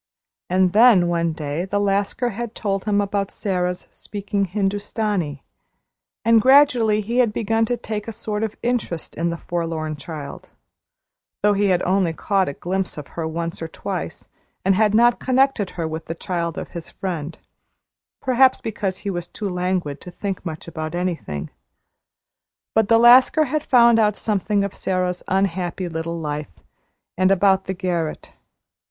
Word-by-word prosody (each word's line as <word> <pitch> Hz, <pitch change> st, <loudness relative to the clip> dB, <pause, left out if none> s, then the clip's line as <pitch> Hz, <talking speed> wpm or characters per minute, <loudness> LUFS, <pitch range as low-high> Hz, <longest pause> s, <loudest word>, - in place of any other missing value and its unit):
And 185 Hz, 0 st, +3 dB
then 215 Hz, -5 st, +6 dB
one 170 Hz, -1 st, +1 dB
day 155 Hz, +1 st, -3 dB
the 200 Hz, +2 st, -1 dB
Lascar 205 Hz, +4 st, 0 dB
had 235 Hz, +2 st, -5 dB
told 195 Hz, -2 st, -2 dB
him 205 Hz, -1 st, +2 dB
about 200 Hz, -1 st, -1 dB
Sara's 180 Hz, -3 st, -2 dB
speaking 200 Hz, -1 st, -3 dB
Hindustani, 195 Hz, -5 st, -2 dB, 0.8 s
and 230 Hz, -1 st, +6 dB
gradually 250 Hz, -5 st, +5 dB
he 235 Hz, +4 st, -1 dB
had 240 Hz, -4 st, +4 dB
begun 225 Hz, +1 st, +1 dB
to 245 Hz, +2 st, -1 dB
take 215 Hz, -2 st, -5 dB
a -, -, -3 dB
sort 210 Hz, -1 st, -4 dB
of 220 Hz, -1 st, -2 dB
interest 235 Hz, -9 st, -2 dB
in 170 Hz, +1 st, -1 dB
the 170 Hz, -, -3 dB
forlorn 165 Hz, -3 st, -3 dB
child, 145 Hz, -1 st, -8 dB, 0.9 s
though 210 Hz, 0 st, +5 dB
he 200 Hz, 0 st, +2 dB
had 180 Hz, -2 st, +2 dB
only 185 Hz, -2 st, +1 dB
caught 195 Hz, +1 st, 0 dB
a -, -, -5 dB
glimpse 185 Hz, +4 st, -3 dB
of 150 Hz, -, -8 dB
her 165 Hz, -1 st, -4 dB
once 165 Hz, +1 st, -4 dB
or 165 Hz, -, -3 dB
twice -, -, -5 dB, 0.4 s
and 195 Hz, -, +5 dB
he 200 Hz, -, +1 dB
had 215 Hz, -1 st, +3 dB
not 240 Hz, +1 st, +5 dB
connected 260 Hz, -6 st, +2 dB
her 165 Hz, -2 st, -1 dB
with 160 Hz, +1 st, -5 dB
the 165 Hz, -, -5 dB
child 170 Hz, -1 st, -3 dB
of -, -, -5 dB
his 170 Hz, -2 st, -8 dB
friend, 165 Hz, -4 st, -5 dB, 0.9 s
perhaps 260 Hz, 0 st, +4 dB
because 205 Hz, -4 st, -3 dB
he 200 Hz, -, 0 dB
was 175 Hz, -2 st, -4 dB
too 210 Hz, -, -5 dB
languid 180 Hz, -5 st, -2 dB
to -, -, -9 dB
think 195 Hz, +2 st, -5 dB
much 160 Hz, -3 st, -6 dB
about 160 Hz, 0 st, -5 dB
anything. 170 Hz, -, -3 dB, 1.2 s
But 220 Hz, -2 st, +3 dB
the 230 Hz, -, +6 dB
Lascar 250 Hz, +6 st, +7 dB
had 305 Hz, +2 st, -1 dB
found 235 Hz, -4 st, +5 dB
out 210 Hz, -2 st, +3 dB
something 205 Hz, -1 st, 0 dB
of 200 Hz, -, -3 dB
Sara's 180 Hz, -1 st, -1 dB
unhappy 185 Hz, -1 st, -1 dB
little 165 Hz, 0 st, -4 dB
life, 150 Hz, -, -5 dB, 0.6 s
and 185 Hz, 0 st, +4 dB
about 195 Hz, 0 st, +3 dB
the 190 Hz, -, -3 dB
garret. 175 Hz, -4 st, -3 dB
190 Hz, 165 wpm, -22 LUFS, 170-215 Hz, 1.2 s, Lascar